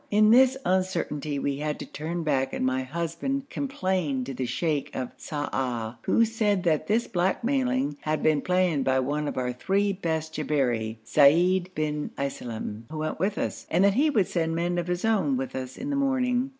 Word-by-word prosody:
In 215 Hz, +1 st, +5 dB
this 260 Hz, +2 st, +6 dB
uncertainty 180 Hz, -6 st, 0 dB
we 140 Hz, 0 st, -1 dB
had 150 Hz, +1 st, -2 dB
to -, -, -7 dB
turn 165 Hz, +3 st, -4 dB
back 135 Hz, -3 st, 0 dB
and -, -, -1 dB
my 130 Hz, 0 st, +1 dB
husband 170 Hz, -, -3 dB
complained 185 Hz, -, -1 dB
to 135 Hz, -, -5 dB
the 130 Hz, 0 st, -3 dB
sheikh 150 Hz, +2 st, -1 dB
of 130 Hz, -1 st, -3 dB
Sa'ah, 125 Hz, -6 st, -3 dB
who 230 Hz, -, +4 dB
said 210 Hz, -4 st, 0 dB
that 155 Hz, -2 st, +1 dB
this 225 Hz, +3 st, +2 dB
blackmailing 250 Hz, -, 0 dB
had 155 Hz, -1 st, -1 dB
been 155 Hz, -2 st, +3 dB
planned 180 Hz, -5 st, +1 dB
by 130 Hz, 0 st, +2 dB
one 145 Hz, +3 st, -1 dB
of -, -, -4 dB
our 125 Hz, -1 st, -1 dB
three 195 Hz, +9 st, +1 dB
best 160 Hz, -4 st, -2 dB
Jabberi, 125 Hz, -8 st, 0 dB
Seid 175 Hz, +8 st, +4 dB
bin 150 Hz, -1 st, -2 dB
Iselem, 115 Hz, -5 st, -4 dB
who 155 Hz, -, -6 dB
went 155 Hz, 0 st, -3 dB
with 195 Hz, +4 st, 0 dB
us, -, -, -3 dB
and 175 Hz, +3 st, +3 dB
that 200 Hz, 0 st, +5 dB
he 290 Hz, +8 st, +3 dB
would 215 Hz, -10 st, +3 dB
send 165 Hz, -2 st, -1 dB
men 175 Hz, +1 st, 0 dB
of 175 Hz, -, -3 dB
his 180 Hz, +3 st, -1 dB
own 190 Hz, -12 st, +2 dB
with 130 Hz, 0 st, -4 dB
us 130 Hz, -1 st, -5 dB
in 280 Hz, +3 st, -4 dB
the -, -, 0 dB
morning. 260 Hz, -2 st, +1 dB
160 Hz, 190 wpm, -26 LUFS, 140-200 Hz, -, this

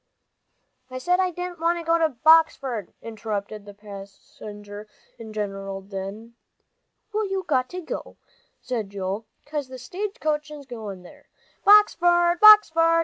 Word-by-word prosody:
"I 255 Hz, -, -6 dB
said 360 Hz, +8 st, +1 dB
I 370 Hz, -1 st, +2 dB
didn't 355 Hz, 0 st, -6 dB
want 335 Hz, +1 st, +1 dB
to 335 Hz, -, -7 dB
go 335 Hz, +1 st, +2 dB
to 320 Hz, -1 st, +3 dB
Boxford," 275 Hz, -, +3 dB
interrupted 215 Hz, -2 st, -5 dB
the 205 Hz, -1 st, -12 dB
passenger 205 Hz, +1 st, -11 dB, 0.3 s
in 230 Hz, -, -9 dB
the 215 Hz, -, -10 dB
general 195 Hz, -2 st, -4 dB
din. 200 Hz, +4 st, -8 dB, 0.8 s
"Well, 425 Hz, -1 st, -1 dB
you've 385 Hz, -1 st, -3 dB
got 255 Hz, 0 st, 0 dB
to," 365 Hz, +7 st, -7 dB, 0.4 s
said 230 Hz, -6 st, -4 dB
Joel, 200 Hz, +2 st, -4 dB, 0.2 s
"'cause 290 Hz, -2 st, -4 dB
the 260 Hz, 0 st, -9 dB
stage 385 Hz, -, -6 dB, 0.3 s
is 295 Hz, -2 st, -10 dB
goin' 215 Hz, -7 st, -8 dB
there. 180 Hz, -, -17 dB, 0.4 s
Boxford 350 Hz, -4 st, +5 dB
Boxford! 330 Hz, -6 st, +7 dB
255 Hz, 140 wpm, -24 LUFS, 205-345 Hz, 0.8 s, Boxford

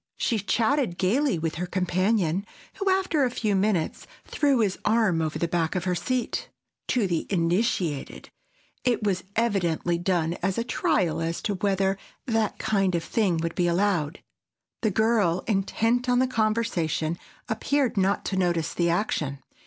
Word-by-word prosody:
She 230 Hz, -, 0 dB
chatted 225 Hz, 0 st, +1 dB
gaily 235 Hz, -, +2 dB
with 160 Hz, 0 st, -3 dB
her 180 Hz, -, -2 dB
companion, 185 Hz, 0 st, +1 dB, 0.3 s
who, 395 Hz, -1 st, 0 dB
after 375 Hz, -6 st, +2 dB
a 255 Hz, -, +2 dB
few 215 Hz, -4 st, -1 dB
minutes, 190 Hz, -4 st, 0 dB, 0.2 s
threw 280 Hz, -5 st, +2 dB
his 200 Hz, -3 st, 0 dB
arm 215 Hz, -7 st, +2 dB
over 155 Hz, -1 st, -2 dB
the 170 Hz, -, 0 dB
back 165 Hz, 0 st, -1 dB
of 180 Hz, -, -1 dB
her 180 Hz, 0 st, 0 dB
seat. 245 Hz, +8 st, -2 dB, 0.4 s
To 240 Hz, -5 st, +1 dB
the 175 Hz, -3 st, -1 dB
initiated, 175 Hz, -, -1 dB, 0.5 s
it 245 Hz, -3 st, +1 dB
was 190 Hz, -3 st, 0 dB
evidently 175 Hz, -6 st, +1 dB
done 175 Hz, -2 st, 0 dB
as 185 Hz, +1 st, 0 dB
a 230 Hz, -, +1 dB
trial 175 Hz, -8 st, 0 dB
as 165 Hz, +1 st, -2 dB
to 205 Hz, -, 0 dB
whether 195 Hz, 0 st, 0 dB, 0.3 s
that 225 Hz, -4 st, 0 dB
kind 195 Hz, -4 st, +1 dB
of 170 Hz, -, -1 dB
thing 195 Hz, -7 st, +1 dB
would 165 Hz, 0 st, -2 dB
be 175 Hz, -, +1 dB
allowed. 175 Hz, -4 st, 0 dB, 0.6 s
The 220 Hz, -, +2 dB
girl, 205 Hz, -4 st, +2 dB
intent 225 Hz, +4 st, +1 dB
on 245 Hz, -, +4 dB
the 255 Hz, -, +4 dB
conversation, 215 Hz, -9 st, 0 dB, 0.3 s
appeared 280 Hz, -3 st, 0 dB
not 195 Hz, 0 st, +1 dB
to 190 Hz, -, -2 dB
notice 175 Hz, -3 st, 0 dB
the 170 Hz, -1 st, +1 dB
action. 165 Hz, -6 st, -1 dB
195 Hz, 160 wpm, -26 LUFS, 170-225 Hz, 0.6 s, on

